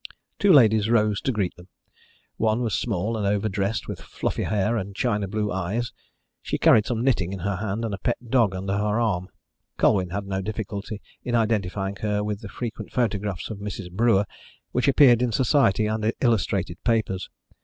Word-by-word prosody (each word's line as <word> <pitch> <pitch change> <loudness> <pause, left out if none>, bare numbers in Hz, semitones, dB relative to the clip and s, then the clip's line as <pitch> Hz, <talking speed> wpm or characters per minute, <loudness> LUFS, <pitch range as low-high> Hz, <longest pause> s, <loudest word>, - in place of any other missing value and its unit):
Two 200 -2 +5
ladies 110 - +5
rose 105 -3 +2
to 135 - 0
greet 100 -6 -1
them. 90 +1 -14 0.7
One 110 +1 +1
was 110 -4 -1
small 105 +2 -1
and 105 -2 -1
overdressed, 100 0 -1
with - - -6
fluffy - - -3
hair 105 +2 +1
and 100 -3 -4
China 105 -4 0
blue 105 +1 -2
eyes. 100 +6 -2 0.5
She - - -2
carried 110 -2 +5
some 120 -1 -1
knitting 105 -9 +1
in 95 - -6
her 100 +1 -1
hand, 110 +3 -2
and 110 - -3
a 100 - -4
pet 120 - 0
dog 115 -5 +3
under 95 +1 -3
her 105 +2 0
arm. 95 -6 0 0.5
Colwyn 95 -4 +3
had 100 +2 -3
no 95 -1 -2
difficulty 105 0 -5 0.2
in 120 - -1
identifying 100 -3 0
her 105 0 -1
with 105 -1 -3
the 105 - -8
frequent 110 -3 -6
photographs 105 -5 -1
of 105 - -6
Mrs. 100 -3 -6
Brewer 105 0 +3 0.5
which 125 +1 0
appeared 130 -4 +6
in 125 -1 +1
Society 115 -4 +3
and 110 +1 0
illustrated 95 -7 0
papers. 110 -5 0
105 Hz, 180 wpm, -25 LUFS, 100-115 Hz, 0.7 s, appeared